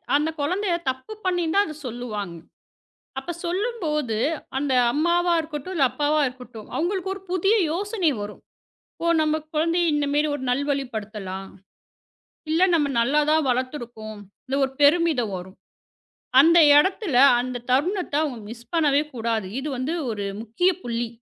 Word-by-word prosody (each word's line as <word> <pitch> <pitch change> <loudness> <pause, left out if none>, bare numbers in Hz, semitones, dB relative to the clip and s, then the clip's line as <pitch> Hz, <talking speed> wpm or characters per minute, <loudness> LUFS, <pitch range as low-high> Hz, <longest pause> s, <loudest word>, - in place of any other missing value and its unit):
அந்தக் 310 +2 0
குழந்தையைத் 345 0 -1
தப்பு 260 +11 -5
பண்ணினா 355 0 +1
அது 310 - -6
சொல்லுவாங்க. 215 -7 -5 0.8
அப்பச் 340 +5 -6
சொல்லும்போது, 340 - -1 0.4
அந்த 280 -1 -1 0.2
அம்மாவா 345 +4 +2
இருக்கட்டும் 310 +3 -6
இல்ல 285 -6 +4
அப்பாவா 300 +1 +1
இருக்கட்டும் 250 -4 -9
அவங்களுக்கு 380 +2 -1
ஒரு 390 - -11
புதிய 385 +4 +3 0.2
யோசனை 390 -1 0
வரும். 205 0 -7 0.6
ஓ - - -1 0.2
நம்ம 310 0 +2 0.2
குழந்தைய 330 +2 +2
இந்த 295 -1 +1
மேரி 295 +1 +2
ஒரு 275 - -6
நல்வழிப்படுத்தலாம். 220 -8 -3 1.0
இல்ல 325 +3 +2
நம்ம 305 -3 +3
நல்லாதான் 300 +4 +2
வளர்த்துருக்கோம். 240 -4 -3 0.4
ஒரு 265 - -3
பெருமிதம் 290 - +3
வரும். 185 +1 -10 0.8
அந்த 335 +4 +6 0.2
இடத்துல 370 - +2 0.2
அந்தத் 245 -1 -5
தருணத்த 350 +5 0
அவங்க 265 -7 -3
மிஸ் 235 0 -11
பண்ணவே 295 -4 +3
கூடாது. 225 -3 -1
இது 280 +3 -4
வந்து 255 +5 -2 0.2
ஒரு 205 -2 -3 0.2
முக்கிய 235 +12 +1
புள்ளி. 235 0 -2
290 Hz, 130 wpm, -24 LUFS, 240-340 Hz, 1.0 s, அந்த